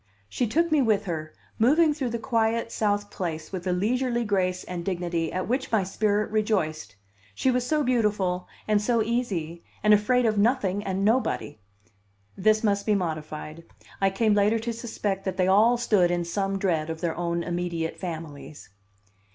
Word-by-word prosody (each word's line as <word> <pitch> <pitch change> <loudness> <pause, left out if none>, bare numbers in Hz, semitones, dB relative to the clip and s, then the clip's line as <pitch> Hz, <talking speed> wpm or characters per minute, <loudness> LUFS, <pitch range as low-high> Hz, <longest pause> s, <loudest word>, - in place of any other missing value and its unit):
She 240 - -1
took 335 +9 +1
me 305 -2 +4
with 220 -5 +2
her, 155 -3 -4 0.3
moving 300 +7 +4
through 275 -4 -3
the 235 - -2
quiet 230 -1 0
South 205 -2 -1
Place 160 -4 -4
with 185 -1 -5
a - - +1
leisurely 240 +6 0
grace 185 -3 0
and 175 -1 -5
dignity 175 -3 -2
at 185 0 -3
which 255 +3 -1
my 220 -4 +3
spirit 205 +2 0
rejoiced; 165 - -1 0.4
she 260 - +2
was 250 0 0
so 305 +1 +1
beautiful, 210 -8 0 0.2
and 210 -1 +3
so 230 +1 +2
easy, 190 -9 -2 0.2
and 210 0 +6
afraid 240 +4 +3
of 215 -2 +2
nothing 205 -3 +1
and 195 0 -1
nobody! 220 - 0 0.8
(This 215 +3 +2
must 200 -1 +1
be 210 - +4
modified. 155 -2 -4 0.4
I 195 - +4
came 210 +2 +2
later 205 +2 +3
to 230 +1 -3
suspect 210 -4 -3
that 190 -1 -3
they 185 - +3
all 220 +6 +5
stood 210 -7 +3
in 175 -1 -1
some 195 +3 -1
dread 165 -5 0
of 160 0 -5
their 170 -2 -1
own 170 0 -2
immediate 175 -2 -3
families.) 160 -4 -7
200 Hz, 175 wpm, -26 LUFS, 175-230 Hz, 0.8 s, and